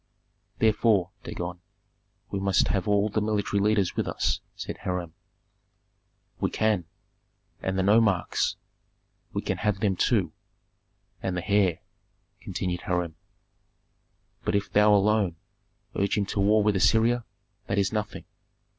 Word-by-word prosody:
"Therefore, 110 -4 +3
Dagon, 90 0 -5 0.7
we 100 - -1
must 95 -1 +2
have 95 -1 0
all 105 0 +3
the 105 +1 0
military 105 -1 0
leaders 105 -3 +2
with - - -1
us," - - -1
said - - -6
Hiram. 90 -3 -3 1.3
"We - - 0
can." 110 -5 +1 0.8
"And 95 0 -2
the 95 - +2
nomarchs." 105 -2 +2 0.8
"We - - -3
can - - -2
have 105 -2 0
them 100 -3 +1
too." - - +1 0.9
"And 95 -1 -2
the 90 - -4
heir," 100 -5 +2 0.6
continued 90 -1 -3
Hiram. 90 -3 -2 1.3
"But - - 0
if 100 0 -1
thou 105 +1 +5
alone 105 -3 +3 0.6
urge 100 +1 +1
him 100 - +1
to 100 - -3
war 105 +2 +4
with 105 -1 +2
Assyria, 115 +5 +3 0.4
that 100 - -1
is 100 +1 +1
nothing. 105 -1 -3
100 Hz, 130 wpm, -27 LUFS, 95-105 Hz, 1.3 s, thou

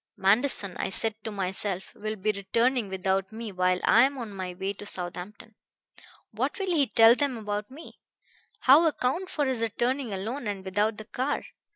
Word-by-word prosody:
Manderson, 200 -1 +2
I - - -1
said 220 +3 0
to - - -4
myself, 195 -1 -2
will 215 +1 -4
be 215 +1 0
returning 230 +3 0
without 190 +1 -1
me 220 -1 -6
while 185 -1 +1
I 225 - +6
am 275 +2 +3
on 230 -5 -6
my 185 -2 -5
way 190 +2 -3
to 205 - -11
Southampton. 185 +5 -5 0.8
What - - -2
will 380 -4 -1
he 285 -4 +3
tell 225 -1 +7
them 270 -1 -1
about 210 -1 -4
me? 290 +5 -13 0.6
How 295 +6 +7
account 320 +5 -1
for 295 - -1
his 260 -3 -1
returning 240 +3 -1
alone 220 +6 -4
and 195 -2 -4
without 210 +3 0
the 215 - -7
car? 260 +6 -2
215 Hz, 180 wpm, -27 LUFS, 195-255 Hz, 0.8 s, tell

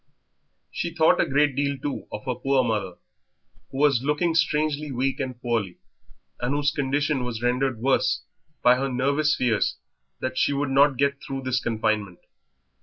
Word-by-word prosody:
She 170 - -3
thought 160 -1 +4
a - - +1
great 145 0 +2
deal, 140 0 0
too, 140 +1 -5
of 105 - -7
her 130 - 0
poor 135 +1 +1
mother, 105 -6 -2 0.7
who 135 - -8
was 140 -4 +3
looking 150 +5 0
strangely 150 -1 0
weak 130 +1 -1
and 130 -3 -4
poorly, 115 -7 -2 0.6
and 125 +3 -1
whose 145 0 +1
condition 145 -1 0
was 120 -2 -5
rendered 125 +1 +1
worse 125 +1 +1 0.4
by 125 0 +6
her 135 +1 -1
nervous 140 +4 +1
fears 120 -4 0 0.4
that 130 0 -3
she - - +2
would 140 -1 -1
not 140 0 +4
get 140 +1 0
through 135 0 -5
this 130 -1 0
confinement. 110 -5 -1
135 Hz, 165 wpm, -25 LUFS, 125-145 Hz, 0.7 s, by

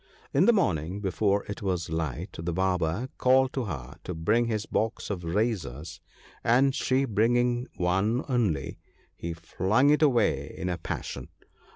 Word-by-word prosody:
In - - +4
the - - +8
morning, 95 - 0
before 100 +1 +1
it 100 - -7
was 90 -5 -2
light, 80 +3 -3
the 85 +1 -2
Barber 90 +5 0
called 130 +1 +4
to 130 -3 -2
her 70 - -6
to 90 - -5
bring 105 +9 +2
his 110 -2 -2
box 110 -1 -2
of 90 -3 -4
razors, 85 - -2 0.4
and 130 +4 +4
she 130 +1 +1
bringing 120 +2 +1
one 95 +7 +1
only, 110 - 0 0.4
he 85 0 -5
flung 95 - +2
it 150 - +3
away 120 - +2
in 90 - -3
a 90 -1 -2
passion. - - -5
100 Hz, 155 wpm, -27 LUFS, 85-120 Hz, 0.4 s, the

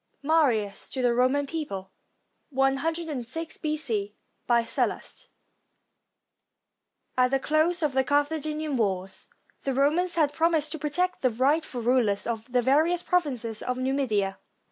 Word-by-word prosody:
MARIUS 250 -11 +1
TO 260 - -3
THE 245 -1 +3
ROMAN 255 +4 +2
PEOPLE 200 - -5 0.6
[io6 290 +2 -1
B.C.] 235 -10 -2 0.3
BY 235 -1 +4
SALLUST - - -2 1.9
[At 250 0 +4
the 270 +1 +1
close 315 +5 +1
of 300 - +2
the 265 0 +3
Carthaginian 300 +1 0
wars, 190 -4 -2 0.3
the 270 -2 -2
Romans 320 +7 +2
had 300 -3 +2
promised 320 -2 +2
to 320 - -5
protect 355 +5 -1
the 255 - +3
rightful 260 +1 0
rulers 230 -5 +2
of 230 +1 -4
the 245 -1 +2
various 315 +7 +3
prov 360 -2 +2
inces 230 -6 -5
of 250 0 -2
Numidia. 255 -7 0
270 Hz, 130 wpm, -27 LUFS, 240-310 Hz, 1.9 s, BY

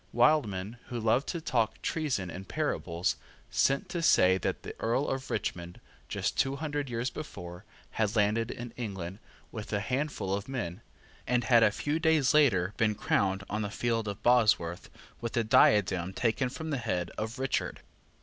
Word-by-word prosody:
Wildman, 120 -5 +2
who 120 -2 -4
loved 115 +5 +2
to 170 - -2
talk 115 -8 0
treason 130 - -1
in 95 +3 -7
parables, 90 - -1 0.3
sent 135 +1 +2
to 175 - -2
say 95 - +5
that - - -2
the - - -6
Earl 120 +5 +1
of 135 0 -3
Richmond, 85 -4 -3 0.3
just - - -2
two 135 0 +2
hundred 145 -1 -3
years 120 +1 -2
before, 90 - -8 0.3
had 110 0 0
landed 110 +2 +2
in 120 -1 -6
England 95 -5 -5 0.3
with 110 -2 -7
a 105 - +1
handful 125 -3 -2
of 100 +4 -3
men, 100 -7 -4 0.5
and 125 0 +2
had 120 -1 +5
a 110 - +6
few 145 +9 -2
days 160 -5 +3
later 105 -11 +4
been 110 -3 +2
crowned, 100 -1 +1
on 105 +1 -2
the 105 - -2
field 115 0 -1
of 100 -1 -5
Bosworth, 105 -8 +3 0.3
with 115 -1 -4
the 120 - +2
diadem 95 -4 +4
taken 120 +4 0
from 160 +4 -6
the 145 - 0
head 90 -8 -2
of 110 +2 -4
Richard. 135 0 -2
115 Hz, 170 wpm, -30 LUFS, 100-130 Hz, 0.5 s, a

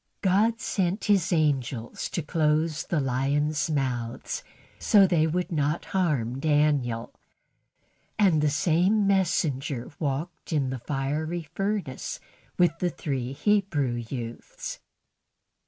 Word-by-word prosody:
God 210 +5 +3
sent 190 -2 -1
His 195 -5 +2
angel 135 -7 0
to 170 - -4
close 155 0 +1
the 170 - +1
lions' 145 +4 0
mouths 130 - -2 0.4
so 205 -3 +6
they 165 -4 +3
would 180 +3 -1
not 150 0 0
harm 140 -10 0
Daniel; 145 -6 +1 1.0
and 185 -8 +4
the 150 - +3
same 180 +7 +2
messenger 150 -9 0
walked 150 +5 -3
in 140 -5 +1
the 130 - -4
fiery 150 +6 -2
furnace 195 -8 -2 0.4
with 170 -2 +3
the 180 - +1
three 130 -6 -3
Hebrew 165 - +1
youths. 120 0 -6
155 Hz, 110 wpm, -27 LUFS, 135-180 Hz, 1.0 s, so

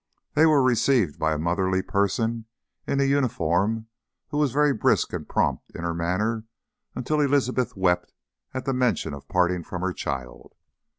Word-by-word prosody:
They 160 +2 +5
were 150 -4 +4
received 120 - +2
by 80 0 +1
a - - -2
motherly 95 +4 0
person 110 +4 0 0.4
in 140 - 0
a - - +4
uniform 110 - +1 0.4
who 145 - -2
was 145 -4 +2
very 145 +2 +3
brisk 110 - +1
and - - -5
prompt - - 0
in 85 - -6
her 85 -1 -1
manner 105 +7 -1 0.5
until 150 +4 0
Elizabeth 130 -5 +1
wept 90 -2 +1 0.4
at 130 0 -5
the 135 - 0
mention 125 - 0
of 70 - -9
parting 90 -1 +1
from 90 +2 -6
her 95 -1 0
child. 65 -5 -6
110 Hz, 165 wpm, -25 LUFS, 90-130 Hz, 0.5 s, They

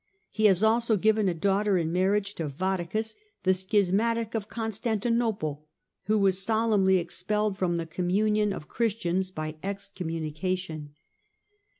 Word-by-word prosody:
He 215 - 0
has 195 -1 +5
also 225 0 +3
given 215 0 +3
a - - 0
daughter 200 +3 +2
in 165 -2 -1
marriage 200 +2 +1
to 165 -5 -4
Vattacus, 190 +7 -2 0.3
the 190 0 +4
schismatic 210 +4 +1
of 215 -2 -3
Constanti 225 0 -2
nople, 200 -11 -1 0.5
who 215 +1 +2
was 195 -2 +3
solemnly 210 -3 +3
expelled 195 +4 -1
from 180 -3 0
the 165 - -2
communion 205 +5 +1
of 150 -6 -6
Christians 190 -5 -1
by 155 -3 -5
excommunication. 165 -5 -4
195 Hz, 130 wpm, -27 LUFS, 175-215 Hz, 0.5 s, has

